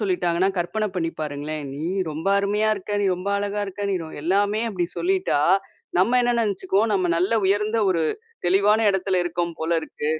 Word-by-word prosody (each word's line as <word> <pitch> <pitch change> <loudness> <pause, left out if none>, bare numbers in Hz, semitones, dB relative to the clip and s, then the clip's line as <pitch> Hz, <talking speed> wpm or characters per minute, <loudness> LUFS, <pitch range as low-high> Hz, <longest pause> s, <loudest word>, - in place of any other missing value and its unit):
சொல்லிட்டாங்கன்னா, 180 -2 +1
கற்பன 185 +5 -1
பண்ணி 165 -2 -1
பாருங்களேன், 150 0 -4
"நீ 145 - -7 0.3
ரொம்ப 155 +4 -6
அருமையா 205 +2 +1
இருக்க! 200 0 -9
நீ 200 - +1
ரொம்ப 180 +2 -5
அழகா 205 0 -2
இருக்க! 195 +1 -7
நீ 195 - +1
ரொ" 160 - -8
எல்லாமே 205 +5 +1
அப்பிடி 180 -5 -2
சொல்லிட்டா, 370 - +1 0.6
நம்ம 235 +7 +4
என்ன 240 0 +2
நெனச்சிக்குவோம், 200 0 0
"நம்ம 185 -2 +1
நல்ல 185 +6 +2
உயர்ந்த 210 +3 +1
ஒரு, 170 -3 +1 0.4
தெளிவான 205 +4 +4
இடத்துல 190 -1 +1
இருக்கோம் 170 -1 -2
போலருக்கு." 160 -2 -1
190 Hz, 165 wpm, -23 LUFS, 170-210 Hz, 0.6 s, நம்ம